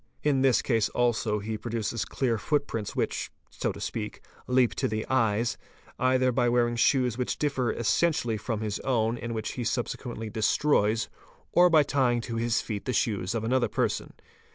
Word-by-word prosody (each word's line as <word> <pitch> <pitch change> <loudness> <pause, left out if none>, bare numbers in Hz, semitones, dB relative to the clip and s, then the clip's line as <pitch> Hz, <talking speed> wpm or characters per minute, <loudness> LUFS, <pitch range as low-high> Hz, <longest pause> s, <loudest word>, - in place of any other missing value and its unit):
In 140 -3 +2
this 130 -3 +3
case 115 -4 +1
also 115 -3 +1
he 105 +1 -4
produces 115 0 -2
clear 120 -5 -1
footprints 130 -5 -2
which, - - -1 0.2
so - - -2
to - - -9
speak, - - -5 0.2
leap 125 -1 +3
to - - -1
the 110 0 -2
eyes, 115 -2 +1 0.4
either 130 0 +3
by 120 0 +2
wearing 120 0 +2
shoes 125 0 +2
which 125 - -1
differ 135 -6 0
essentially 120 -1 +1
from 110 0 -3
his 105 -2 -2
own 115 -3 +1
and 115 0 -4
which 110 -1 -3
he 125 - -4
subsequently 115 -1 -3
destroys, 110 -1 +2 0.4
or 180 0 +6
by 160 -3 +6
tying 130 -4 +1
to 115 0 -5
his 115 0 +1
'feet 105 -3 -5
the 130 - -1
shoes 100 -3 0
of 110 - -1
another 120 +1 +2
person. - - -1
120 Hz, 175 wpm, -27 LUFS, 110-130 Hz, 0.4 s, or